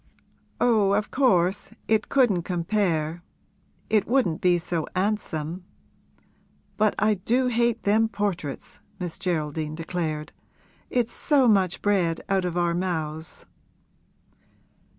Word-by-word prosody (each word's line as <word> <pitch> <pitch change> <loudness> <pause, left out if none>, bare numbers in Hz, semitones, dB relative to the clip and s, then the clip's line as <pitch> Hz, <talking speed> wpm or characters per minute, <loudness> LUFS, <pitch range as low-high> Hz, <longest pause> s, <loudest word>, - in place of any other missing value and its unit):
'Oh, 215 -5 +3
of 210 +1 0
course 195 -8 +2 0.2
it 220 -1 +1
couldn't 240 -10 +3
compare 170 -2 -1 0.7
it 215 -2 +2
wouldn't 225 -11 +1
be 180 -1 +4
so 165 -1 -3
'andsome! 185 -4 -2 1.1
But 215 -1 +2
I 215 +1 +3
do 240 +7 +1
hate 235 -1 +1
them 220 +2 +3
portraits!' 195 -9 -4 0.2
Miss 180 -1 -5
Geraldine 155 -4 -2
declared. 160 -2 -3 0.6
'It's 240 -2 0
so 280 -5 +3
much 195 -5 +2
bread 180 -5 +1
out 190 -2 +1
of 175 -1 -2
our 175 -1 +1
mouths.' 160 -3 -4
185 Hz, 110 wpm, -25 LUFS, 165-215 Hz, 1.1 s, be